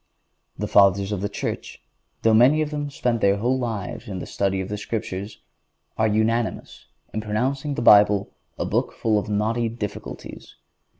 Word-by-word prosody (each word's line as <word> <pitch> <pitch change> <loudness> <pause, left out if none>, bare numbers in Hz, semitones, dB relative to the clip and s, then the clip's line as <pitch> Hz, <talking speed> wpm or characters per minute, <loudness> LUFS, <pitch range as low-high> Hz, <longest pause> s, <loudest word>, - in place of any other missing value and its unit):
The 105 - -3
Fathers 100 0 +4
of 100 -3 -2
the 100 - -2
Church, 100 - -5 0.4
though 115 - +4
many 130 +8 +5
of 150 - -5
them 145 -1 -3
spent 120 -4 -1
their 100 0 +3
whole 125 +5 0
lives 115 -5 -4
in 95 -3 -5
the - - -5
study 95 -1 -1
of 95 - -3
the 105 - -4
Scriptures, 100 -2 -5 0.5
are 110 - +2
unanimous 110 +2 -1 0.3
in 110 - -2
pronouncing 130 +7 -1
the 120 - -2
Bible 105 -2 +6 0.3
a - - -2
book - - -1
full 110 -2 +1
of 105 - -6
knotty 110 +3 0
difficulties. 110 -2 -7
110 Hz, 170 wpm, -23 LUFS, 100-120 Hz, 0.5 s, Bible